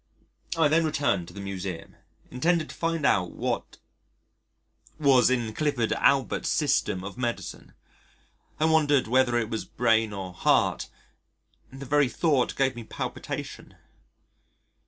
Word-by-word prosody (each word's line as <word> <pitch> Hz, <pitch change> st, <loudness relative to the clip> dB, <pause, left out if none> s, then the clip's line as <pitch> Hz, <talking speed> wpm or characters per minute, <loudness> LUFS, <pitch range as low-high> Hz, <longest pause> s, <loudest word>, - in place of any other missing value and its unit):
I 160 Hz, -2 st, +4 dB
then 160 Hz, +3 st, +3 dB
returned 140 Hz, -, 0 dB
to 90 Hz, -, -12 dB
the -, -, -7 dB
Museum 95 Hz, -3 st, -6 dB, 0.4 s
intending 160 Hz, +5 st, +1 dB
to -, -, -10 dB
find 165 Hz, -3 st, -2 dB
out 90 Hz, -10 st, +2 dB
what -, -, -3 dB, 1.2 s
was 135 Hz, -5 st, +5 dB
in 120 Hz, -4 st, -1 dB
Clifford 140 Hz, -5 st, 0 dB
Allbutt's 135 Hz, -4 st, +2 dB
System 90 Hz, -, +1 dB
of 100 Hz, +5 st, -8 dB
Medicine. 120 Hz, -2 st, -5 dB, 0.8 s
I 155 Hz, -, +2 dB
wondered 150 Hz, -5 st, +3 dB
whether 125 Hz, 0 st, +3 dB
it 115 Hz, -1 st, -2 dB
was 110 Hz, -, -2 dB
brain 115 Hz, -2 st, +1 dB
or 95 Hz, -2 st, -6 dB
heart; 85 Hz, -, +1 dB, 0.8 s
and 135 Hz, -, -12 dB
the 140 Hz, -, -7 dB
very 145 Hz, 0 st, +2 dB
thought 145 Hz, -3 st, +1 dB
gave 135 Hz, -2 st, +1 dB
me 120 Hz, -, -7 dB
palpitation. -, -, -6 dB
125 Hz, 135 wpm, -26 LUFS, 110-145 Hz, 1.2 s, was